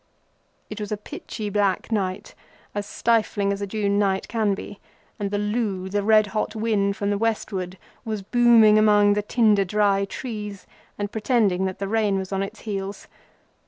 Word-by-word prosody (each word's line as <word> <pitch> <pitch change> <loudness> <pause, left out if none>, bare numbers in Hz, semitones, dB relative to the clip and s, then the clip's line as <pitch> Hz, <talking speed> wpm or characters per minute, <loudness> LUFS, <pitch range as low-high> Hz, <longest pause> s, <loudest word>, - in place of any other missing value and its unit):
It 210 - -6
was 210 -1 -5
a 210 - -1
pitchy 210 0 -7
black 200 0 0
night, 190 -4 -2 0.4
as 205 0 -4
stifling 215 -3 +1
as 200 - -6
a 200 - -2
June 200 0 0
night 195 -2 0
can 215 -4 0
be, 205 +1 -9 0.4
and 200 -1 -2
the 205 - -1
loo, 205 -3 -2
the 205 +1 0
red 215 +1 +5
hot 215 0 -2
wind 210 -2 0
from 200 0 -1
the 200 - -1
westward, 195 -5 -2 0.3
was 215 -4 -4
booming 230 -1 +5
among 205 -1 +5
the 210 - 0
tinder 210 -2 +3
dry 200 0 +2
trees 210 -3 -6 0.3
and 205 0 -3
pretending 215 -5 +1
that 190 -1 -3
the 195 - -3
rain 210 -2 +1
was 190 0 -5
on 195 0 -1
its 195 - -6
heels. 200 -2 -5
205 Hz, 175 wpm, -24 LUFS, 195-215 Hz, 0.4 s, red